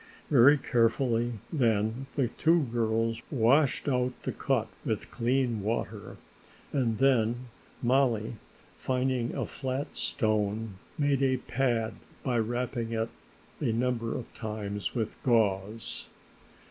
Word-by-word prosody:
Very 140 +2 +7
carefully 120 -2 +1 0.2
then 115 -1 +1
the 135 -6 +1
two 165 +5 +3
girls 115 0 +1
washed 135 +3 +3
out 125 -2 +1
the - - -1
cut 125 -5 0 0.2
with 110 -3 -3
clean 120 -2 +1
water 110 +4 -3 0.6
and 120 -6 +1
then 125 -2 +2 0.3
Mollie, 120 -3 +2 0.4
finding 130 -2 0
a - - -1
flat 135 +1 -4
stone, 110 -3 -1 0.2
made 145 -2 +2
a 130 -1 +3
pad 120 -3 0 0.3
by 125 -3 +1
wrapping 120 0 -2
it 115 0 -1 0.5
a - - +1
number 115 -1 0
of 125 - -8
times 105 -2 -4
with 110 -3 -3
gauze. 110 -3 0
120 Hz, 115 wpm, -29 LUFS, 110-130 Hz, 0.6 s, Very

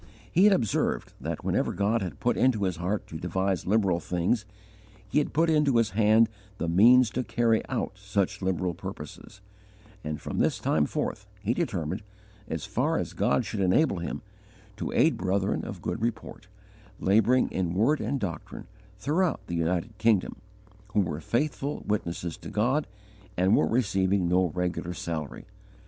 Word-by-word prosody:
He 185 +4 +5
had 210 - +7
observed 115 - 0
that - - -4
whenever - - +1
God 105 +4 +1
had 90 -3 -5
put 120 - +1
into 125 -6 +2
his 90 -3 -1
heart 95 +5 -2
to 80 - -8
devise 95 +2 -1
liberal 95 -4 +2
things, 90 +6 0 0.6
He 100 - +2
had 145 - -1
put 165 +2 +2
into 150 -5 +3
his 115 -1 +2
hand 110 +2 +5 0.3
the 85 - -2
means 115 +8 +6
to 130 - -1
carry 115 -2 +1
out 115 -6 -3
such 100 0 -1
liberal 90 -1 0
purposes; 100 +4 -9 0.6
and 75 0 -4
from - - -4
this - - +2
time 75 -2 +1
forth 100 - -3 0.2
he 110 +3 +1
determined, 100 - -2 0.5
as 80 -5 -4
far - - 0
as - - -3
God - - +1
should 105 - -4
enable 95 - +3
him, 85 - -5 0.5
to - - -3
aid - - +3
brethren 95 +1 0
of - - -7
good 110 - -3
report, 115 -4 -4 0.5
labouring 110 +6 +3
in 90 -2 -1
word 125 +10 +2
and 140 - -1
doctrine, 90 -8 -5 0.3
throughout 155 - 0
the 85 - -4
United 85 +6 -1
Kingdom, 110 -4 +2 0.6
who 105 - +4
were 80 -4 -3
faithful 140 - -1
witnesses 85 -5 -2
to - - -9
God 120 +9 +1 0.5
and 95 +3 +4
were - - +3
receiving 100 -5 +1
no 90 +1 +3
regular 90 0 -2
salary. 80 -5 -5
100 Hz, 160 wpm, -27 LUFS, 90-115 Hz, 0.6 s, had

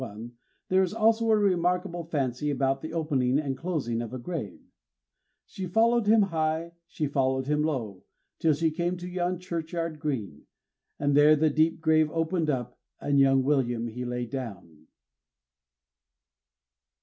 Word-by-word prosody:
151) 120 0 -8 0.3
there 185 +1 +4
is 190 +2 -1
also 225 0 +3
a 220 - +5
remarkable 180 -2 0
fancy 145 -3 -2
about 135 -1 0
the 160 - -6
opening 140 -6 +1
and 140 -3 -1
closing 130 -8 -2
of 115 - -6
a 130 - -5
grave: 130 - -5 0.9
She 190 -1 -6
followed 225 +3 +2
him 215 0 +6
high, 160 -2 -1 0.2
she 155 - -3
followed 130 -2 0
him 150 +2 +1
low, 120 -11 -2 0.4
Till 160 -2 +3
she 160 +2 +1
came 175 +3 -2
to 175 0 -7
yon 180 0 -1
churchyard 165 -2 -4
green; 115 - -4 0.5
And 145 0 +1
there 150 +1 +7
the 155 0 +2
deep 160 +2 +1
grave 155 -1 +3
opened 165 0 -1
up, 125 -3 -3 0.2
And 140 -1 +1
young 135 -1 +4
William 120 -4 0
he 125 +3 -6
lay 125 0 -3
down. 95 - -8
155 Hz, 150 wpm, -27 LUFS, 130-170 Hz, 0.9 s, there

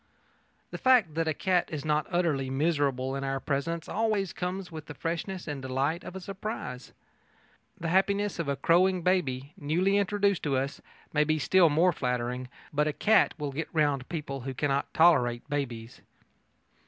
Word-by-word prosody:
The - - -6
fact 245 -11 +4
that 165 +1 -1
a 160 - +1
cat 180 0 +1
is 155 -1 -4
not 150 -1 +1
utterly 160 -7 0
miserable 135 -2 0
in 135 - -3
our 135 0 -1
presence 155 +5 -2
always 210 -4 0
comes 180 0 -4
with 155 -2 -8
the 150 - -8
freshness 170 +4 -4
and 145 -3 -4
delight 135 +6 -1
of 185 - -8
a - - -4
surprise. 190 - -6 0.9
The 165 - -2
happiness 200 +2 +1
of 165 - -2
a 140 - 0
crowing 175 +5 +3
baby, 145 -7 0
newly 180 +5 +1
introduced 200 -1 +1
to 140 -3 0
us, 135 +2 -3 0.3
may 150 -1 +4
be 155 +1 +1
still 170 +4 +4
more 170 +4 +3
flattering, 125 -1 -2 0.2
but 150 +1 +2
a 155 - 0
cat 215 +8 +3
will 145 -2 -3
get 155 +4 -4
round 145 -5 +1
people 145 -5 -4
who 130 +1 -5
cannot 140 +1 0
tolerate 125 -8 +3
babies. 120 -5 -4
155 Hz, 170 wpm, -28 LUFS, 135-180 Hz, 0.9 s, fact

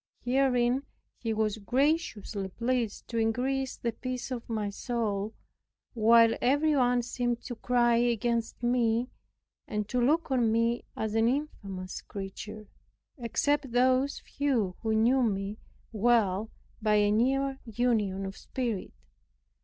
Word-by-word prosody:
Herein 250 0 +2 0.4
he 230 - -2
was 220 -1 0
graciously 240 -5 0
pleased 235 +2 -2
to 230 - -1
increase 255 +4 0
the 235 - -2
peace 255 +2 -5
of 240 -2 -5
my 215 -3 -2
soul, 215 -2 -2 0.6
while 230 0 +6
every 290 +4 +3
one 245 -2 +3
seemed 240 0 -2
to 245 - -5
cry 240 0 +2
against 235 0 0
me, 240 0 +1 0.6
and 210 -1 -2
to 250 - 0
look 305 +5 +2
on 240 -4 +3
me 230 +1 +1
as 220 -1 -2
an 225 +1 +3
infamous 200 -9 -3
creature, 210 +2 -7 0.5
except 270 +2 0
those 255 +3 +2
few 240 -10 -1
who 220 -1 0
knew 240 +5 +4
me 200 -2 -1 0.3
well 220 -2 +2 0.3
by 215 -1 +3
a 205 0 +4
near 270 +4 +1
union 215 -4 0
of 195 0 -6
spirit. 235 -7 -4
235 Hz, 130 wpm, -29 LUFS, 215-255 Hz, 0.6 s, while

